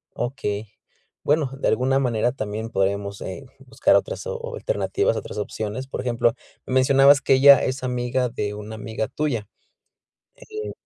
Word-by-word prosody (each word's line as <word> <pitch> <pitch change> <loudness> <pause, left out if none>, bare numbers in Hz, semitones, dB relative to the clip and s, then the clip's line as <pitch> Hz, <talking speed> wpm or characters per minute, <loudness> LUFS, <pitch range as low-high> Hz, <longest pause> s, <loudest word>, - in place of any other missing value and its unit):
Okey. 110 -4 -3 0.6
Bueno, 145 -2 +1
de - - 0
alguna 135 +2 +2
manera 120 -2 +1
también 110 -2 -5
podremos, 100 0 -1
eh, 95 +9 -6
buscar 135 -1 +2
otras - - -1
o 480 0 -5
alternativas, 485 -2 0
otras - - -6
opciones. 110 +5 -4
Por 135 - -4
ejemplo, 120 -2 +1 0.3
me - - -5
mencionabas 135 +2 +5
que 135 - +3
ella 140 +1 +8
es 130 0 -2
amiga 125 0 -1
de 105 -2 -3
una 105 +1 -7
amiga 110 0 -4
tuya, 125 -8 -2 0.9
eh 435 -3 -7
130 Hz, 150 wpm, -23 LUFS, 110-140 Hz, 0.9 s, ella